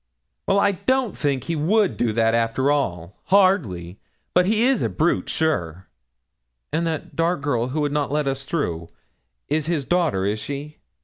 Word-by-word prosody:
'Well, 200 - +3
I 200 0 +4
don't 255 +3 0
think 140 -3 -1
he 165 - -2
would 195 +7 +2
do 120 -2 0
that, 115 +1 +2
after 115 +4 +1
all 95 - -2
hardly; 135 - +2 0.3
but 180 0 +4
he 220 +2 +2
is 260 -2 +3
a - - 0
brute, 165 +2 0
sure!' 95 - -1 0.9
'And 165 +1 0
that 160 -2 -4
dark 165 -1 +1
girl 125 -4 0
who 145 +4 -2
would 145 -1 0
not 145 -1 -1
let 150 -1 0
us 135 0 -2
through, 85 - -3 0.6
is 155 +1 -1
his 160 -5 -1
daughter, 165 - +1
is 105 +2 -1
she?' 145 +4 -7
145 Hz, 175 wpm, -23 LUFS, 115-175 Hz, 0.9 s, I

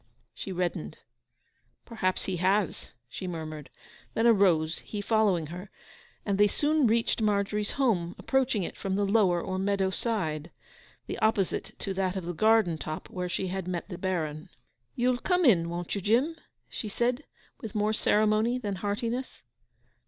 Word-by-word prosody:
She 195 - -6
reddened. 175 - -2 0.9
'Perhaps 185 -6 -1
he 185 -2 -2
has!' 190 +1 +1 0.2
she 185 +9 -6
murmured; 155 -4 -6 0.5
then 225 - +2
arose, 180 -8 +4
he 210 - -6
following 205 -5 +2
her; 180 +3 -8 0.6
and 200 -1 0
they 205 - +7
soon 295 +5 +2
reached 230 +1 +1
Margery's 210 0 0
home, 195 -11 +1
approaching 260 -6 +1
it - - -5
from 190 -1 -2
the 200 +1 +1
lower 195 -4 +3
or 185 +2 -3
meadow 195 -1 +1
side—the 170 -8 -5
opposite 215 -4 0
to 195 - -3
that 190 -1 -1
of 190 -3 -3
the 175 - -3
garden 215 -3 +3
top, 155 +1 -6
where 180 -1 -3
she 185 +1 -2
had 190 -1 -3
met 180 +1 -3
the 180 - -5
Baron. 160 -5 -2 0.5
'You'll 245 0 +2
come 360 +2 +2
in, 170 -9 +5
won't 175 0 -4
you, 200 - -2
Jim?' 245 - +2 0.3
she 220 - -5
said, 240 +6 0 0.4
with 220 -3 -7
more 210 +1 +2
ceremony 215 +3 +2
than 205 -6 -3
heartiness. 230 +6 -3
200 Hz, 155 wpm, -28 LUFS, 180-225 Hz, 0.9 s, they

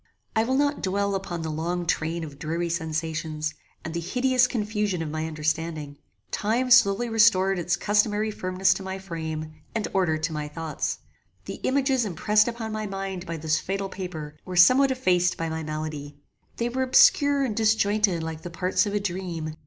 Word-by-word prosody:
I 220 - +3
will 260 +2 0
not 285 +1 +1
dwell 200 +1 0
upon 180 -4 -3
the 160 - -3
long 175 +3 -2
train 165 +1 -1
of 145 -3 -9
dreary 170 +3 -2
sensations, 160 -1 -2 0.3
and 160 - -4
the 170 - -2
hideous 250 +7 +2
confusion 210 -6 -1
of 155 - -5
my 155 +1 -2
understanding. 155 -1 -3 0.3
Time 240 +5 0
slowly 240 -2 +5
restored 195 -4 +4
its 175 0 +1
customary 210 +2 +1
firmness 185 -1 +1
to - - -7
my 190 0 -5
frame, 160 -4 -5 0.2
and 220 - -1
order 180 -5 +2
to 155 +1 -2
my 150 -1 -3
thoughts. 160 +1 -3 0.5
The - - -6
images 265 -1 +2
impressed 210 +2 +2
upon 230 -2 -4
my 215 0 -3
mind 195 -2 -5
by 170 - -4
this 155 0 0
fatal 195 +1 -3
paper 160 -6 -6
were 185 - -6
somewhat 255 +10 +6
effaced 180 -9 +2
by 165 0 -2
my 160 0 -3
malady. 155 -2 -5 0.4
They 235 0 0
were 260 +2 -2
obscure 280 +2 +5
and 235 -6 -1
disjointed 210 -5 +2
like 160 -1 -5
the 175 - -7
parts 185 +4 0
of 205 - -2
a - - +2
dream. 175 -5 -4
185 Hz, 180 wpm, -25 LUFS, 160-215 Hz, 0.5 s, somewhat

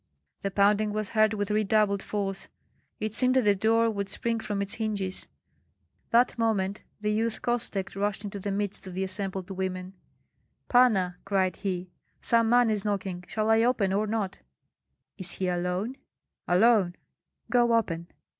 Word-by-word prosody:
The 195 - -1
pounding 205 +2 +3
was 215 -1 -2
heard 215 -1 +3
with 205 0 -2
redoubled 210 -1 +2
force; 195 -2 -3 0.5
it 215 0 -3
seemed 255 +2 +2
that 260 - +4
the 205 -1 +5
door 225 +3 +3
would 200 -2 -3
spring 230 +3 -1
from 205 -2 -3
its 200 0 -2
hinges. 205 -4 -3 0.8
That 240 +2 +4
moment 205 -3 0 0.2
the 210 0 0
youth 225 +1 -1
Kostek 230 -6 -2
rushed 200 +1 -1
into 200 -1 -5
the 200 +1 -3
midst 200 -1 -3
of 180 - -7
the 190 - -1
assembled 190 -1 -4
women. 185 0 -4 0.8
"Panna!" 195 -8 +4
cried 190 -2 0
he, 185 -2 -3 0.3
"some 230 -1 +2
man 240 -1 +5
is 210 -2 -1
knocking; 195 -3 -2
shall 215 +1 0
I 225 0 +5
open 230 -5 +2
or 210 +2 +1
not?" 210 -3 -2 0.8
"Is 180 -2 -2
he 185 - -2
alone?" 180 +7 -1 0.5
"Alone." 190 -1 +4 0.6
"Go 240 -1 +4
open." 170 -7 -1
205 Hz, 155 wpm, -28 LUFS, 190-220 Hz, 0.8 s, the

